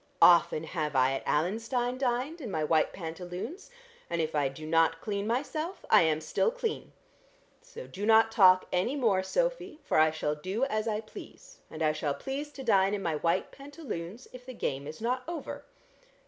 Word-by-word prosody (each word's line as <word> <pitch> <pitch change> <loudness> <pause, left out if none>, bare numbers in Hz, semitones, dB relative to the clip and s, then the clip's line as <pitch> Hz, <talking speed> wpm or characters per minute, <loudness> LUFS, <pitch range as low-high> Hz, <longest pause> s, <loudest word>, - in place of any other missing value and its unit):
Often 170 -2 +6
have 155 -3 -3
I 130 0 +4
at 135 - -4
Allenstein 230 - 0
dined 265 +6 -1
in 245 - -5
my 160 -5 -1
white 155 0 +2
pantaloons, 180 - -7 0.4
and 170 - -2
if 160 -1 -1
I 145 -2 +2
do 145 +3 -10
not 165 +1 +2
clean 200 +1 -3
myself, 310 - -3
I - - +8
am 160 -2 +1
still 155 - +1
clean. 475 -2 -4 0.7
So - - -10
do 200 - -8
not 225 +1 +5
talk 185 -4 +6
any 185 +10 +1
more, 220 -9 +2
Sophy, 385 - -2
for - - +1
I 155 0 +6
shall 155 -1 -2
do 185 - -3
as 215 -5 -2
I 215 -1 -1
please, 215 - -13
and 160 0 -5
I 155 - +3
shall 150 -2 -2
please 285 +2 -5
to 270 - -8
dine 200 -4 +3
in 200 - -5
my 160 -3 -1
white 170 +4 0
pantaloons 260 - -8
if 250 0 -10
the 255 0 -9
game 140 -7 -3
is 155 +5 -9
not 250 +3 0
over. 340 -1 -6
200 Hz, 190 wpm, -29 LUFS, 160-260 Hz, 0.7 s, I